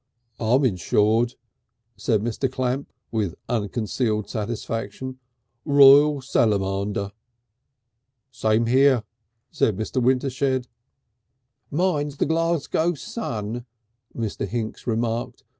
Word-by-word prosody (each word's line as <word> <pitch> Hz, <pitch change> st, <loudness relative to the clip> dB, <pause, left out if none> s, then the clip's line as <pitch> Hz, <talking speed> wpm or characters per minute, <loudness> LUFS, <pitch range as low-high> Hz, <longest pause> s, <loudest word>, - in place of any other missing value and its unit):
"I'm 125 Hz, +5 st, +3 dB
insured," 110 Hz, +3 st, +2 dB, 0.6 s
said 105 Hz, 0 st, 0 dB
Mr. 120 Hz, +3 st, -1 dB
Clamp, 130 Hz, +1 st, -2 dB, 0.2 s
with 105 Hz, -7 st, -1 dB
unconcealed 110 Hz, 0 st, -1 dB
satisfaction. 115 Hz, +3 st, -4 dB, 0.4 s
"Royal 140 Hz, 0 st, +7 dB
Salamander." 100 Hz, -4 st, 0 dB, 1.2 s
"Same 110 Hz, -1 st, +1 dB
here," 130 Hz, 0 st, +4 dB, 0.5 s
said 105 Hz, -4 st, +1 dB
Mr. 110 Hz, +4 st, -2 dB
Wintershed. 130 Hz, 0 st, +1 dB, 1.0 s
"Mine's 150 Hz, -3 st, 0 dB
the -, -, +1 dB
Glasgow 165 Hz, +1 st, +1 dB
Sun," 120 Hz, -, -5 dB, 0.5 s
Mr. 110 Hz, -4 st, -3 dB
Hinks 110 Hz, +3 st, -4 dB
remarked. 115 Hz, 0 st, -2 dB
120 Hz, 85 wpm, -24 LUFS, 110-135 Hz, 1.2 s, Royal